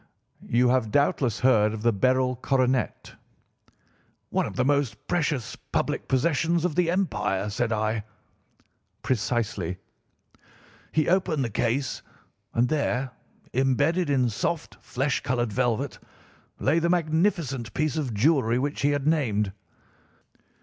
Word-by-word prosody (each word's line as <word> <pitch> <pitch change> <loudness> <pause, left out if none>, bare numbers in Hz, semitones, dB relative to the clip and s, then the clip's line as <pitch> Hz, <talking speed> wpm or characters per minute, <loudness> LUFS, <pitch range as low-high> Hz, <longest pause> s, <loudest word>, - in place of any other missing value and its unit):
'You 125 +2 +2
have 125 -3 +2
doubtless 130 -2 +1
heard 110 -4 +4
of 110 - -7
the 120 -1 +3
Beryl 130 +5 +2
Coronet?' 130 0 0 1.2
"'One - - +1
of - - -8
the 125 - +1
most 140 -1 0
precious 150 -8 -1 0.2
public - - -1
possessions 165 +5 +1
of 180 - 0
the 175 +1 +2
empire,' 105 - 0
said 115 +3 -1
I. 110 0 0 1.0
"'Precisely.' 105 -7 -1 1.1
He 155 -1 +1
opened 170 -6 +1
the 115 - -4
case, 120 +6 -1 0.5
and 120 +2 +3
there, 135 -3 -1 0.4
imbedded 145 +7 +2
in 130 -3 +3
soft, 160 +9 -3
flesh 135 +1 -1
coloured 120 -4 -1
velvet, 125 +2 -1 0.6
lay 165 - +2
the 170 +1 0
magnificent 160 - 0
piece 155 -2 0
of 135 -8 -2
jewellery 120 -1 +3
which 140 +3 -2
he 140 - +3
had 145 -1 0
named. 115 -11 +1
130 Hz, 125 wpm, -26 LUFS, 115-150 Hz, 1.2 s, heard